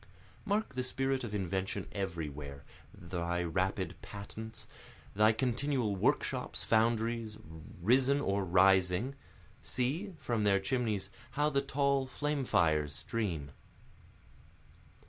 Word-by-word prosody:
Mark 210 Hz, -2 st, 0 dB
the 130 Hz, 0 st, -1 dB
spirit 135 Hz, +1 st, 0 dB
of 105 Hz, -3 st, -4 dB
invention 95 Hz, -1 st, -2 dB
everywhere, 75 Hz, -7 st, -4 dB, 0.3 s
thy 85 Hz, 0 st, -2 dB
rapid 95 Hz, +3 st, 0 dB
patents, 110 Hz, +2 st, -7 dB, 0.5 s
Thy 105 Hz, +2 st, +5 dB
continual 125 Hz, -1 st, 0 dB
workshops, 95 Hz, -, 0 dB
foundries, 115 Hz, -1 st, +1 dB, 0.4 s
risen 130 Hz, +8 st, +4 dB
or 100 Hz, -7 st, 0 dB
rising, 95 Hz, +5 st, +4 dB, 0.5 s
See, 160 Hz, +10 st, -2 dB
from 115 Hz, -7 st, -1 dB
their 100 Hz, -1 st, +4 dB
chimneys 105 Hz, -3 st, -1 dB, 0.2 s
how 150 Hz, +1 st, +2 dB
the 140 Hz, -1 st, +2 dB
tall 140 Hz, -1 st, +1 dB
flame 145 Hz, +1 st, -1 dB
fires 75 Hz, -9 st, +2 dB
stream. 80 Hz, -, -3 dB
110 Hz, 105 wpm, -33 LUFS, 95-130 Hz, 0.5 s, Thy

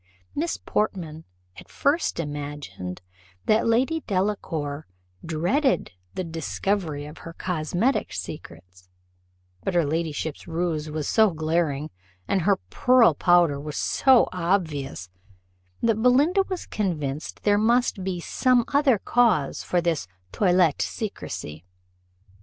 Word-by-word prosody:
Miss 330 Hz, +3 st, -1 dB
Portman 170 Hz, -7 st, -2 dB, 0.3 s
at -, -, -13 dB
first 290 Hz, -, 0 dB
imagined 145 Hz, -, -6 dB, 0.4 s
that 215 Hz, +2 st, +3 dB
Lady 260 Hz, +8 st, +2 dB
Delacour 165 Hz, -7 st, -2 dB, 0.4 s
dreaded 180 Hz, -, +1 dB, 0.2 s
the 185 Hz, -, -2 dB
discovery 165 Hz, -1 st, -2 dB
of 150 Hz, +1 st, -10 dB
her 165 Hz, -, -9 dB
cosmetic 180 Hz, -, -1 dB
secrets, 90 Hz, +1 st, -9 dB, 0.7 s
but 190 Hz, -, -2 dB
her 170 Hz, -3 st, +3 dB
ladyship's 160 Hz, 0 st, -3 dB
rouge 165 Hz, -2 st, -2 dB
was 150 Hz, -1 st, -3 dB
so 220 Hz, -1 st, +4 dB
glaring, 155 Hz, -3 st, -1 dB, 0.4 s
and 195 Hz, -, +1 dB
her 200 Hz, +4 st, +3 dB, 0.2 s
pearl 250 Hz, -8 st, +5 dB
powder 175 Hz, -3 st, +3 dB
was 150 Hz, 0 st, -6 dB
so 260 Hz, -3 st, +4 dB
obvious, 165 Hz, -, -1 dB, 0.8 s
that 225 Hz, -1 st, +2 dB
Belinda 285 Hz, -, +4 dB
was 370 Hz, -2 st, -4 dB
convinced 155 Hz, -8 st, -3 dB
there 205 Hz, 0 st, +3 dB
must 230 Hz, -2 st, +2 dB
be 185 Hz, -2 st, -2 dB
some 245 Hz, +6 st, +2 dB
other 280 Hz, -4 st, +4 dB
cause 215 Hz, -, +2 dB
for 175 Hz, -, 0 dB
this 165 Hz, -, -1 dB, 0.2 s
toilette 180 Hz, -6 st, +3 dB
secrecy. 80 Hz, -, -5 dB
175 Hz, 115 wpm, -25 LUFS, 150-220 Hz, 0.8 s, pearl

